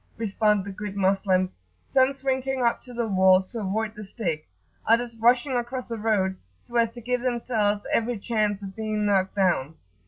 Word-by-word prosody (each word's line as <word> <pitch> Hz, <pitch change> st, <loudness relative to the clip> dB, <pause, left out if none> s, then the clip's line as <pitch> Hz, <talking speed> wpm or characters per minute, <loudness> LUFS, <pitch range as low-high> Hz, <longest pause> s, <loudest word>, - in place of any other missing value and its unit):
respond 210 Hz, -2 st, +1 dB
the 200 Hz, -, -5 dB
good 205 Hz, 0 st, -6 dB
Moslems, 190 Hz, -, +1 dB, 0.3 s
some 265 Hz, 0 st, +4 dB
shrinking 265 Hz, -1 st, -1 dB
up 235 Hz, -, +1 dB
to 250 Hz, -, -11 dB
the 235 Hz, -1 st, -2 dB
walls 190 Hz, -1 st, +4 dB
to 235 Hz, -, -4 dB
avoid 215 Hz, +2 st, -2 dB
the 210 Hz, -1 st, -9 dB
stick, 175 Hz, -7 st, -4 dB, 0.4 s
others 235 Hz, +1 st, +2 dB
rushing 245 Hz, +4 st, +3 dB
across 245 Hz, +1 st, -3 dB
the 230 Hz, -2 st, -5 dB
road, 205 Hz, -3 st, +1 dB, 0.3 s
so 240 Hz, -, -12 dB
as 230 Hz, -1 st, +4 dB
to 240 Hz, -, -11 dB
give 250 Hz, +1 st, -1 dB
themselves 230 Hz, -4 st, 0 dB
every 230 Hz, +1 st, +1 dB
chance 210 Hz, -2 st, -1 dB
of 190 Hz, -1 st, -7 dB
being 215 Hz, -1 st, -2 dB
knocked 195 Hz, -2 st, +1 dB
down. 175 Hz, -7 st, +1 dB
215 Hz, 180 wpm, -25 LUFS, 195-240 Hz, 0.4 s, some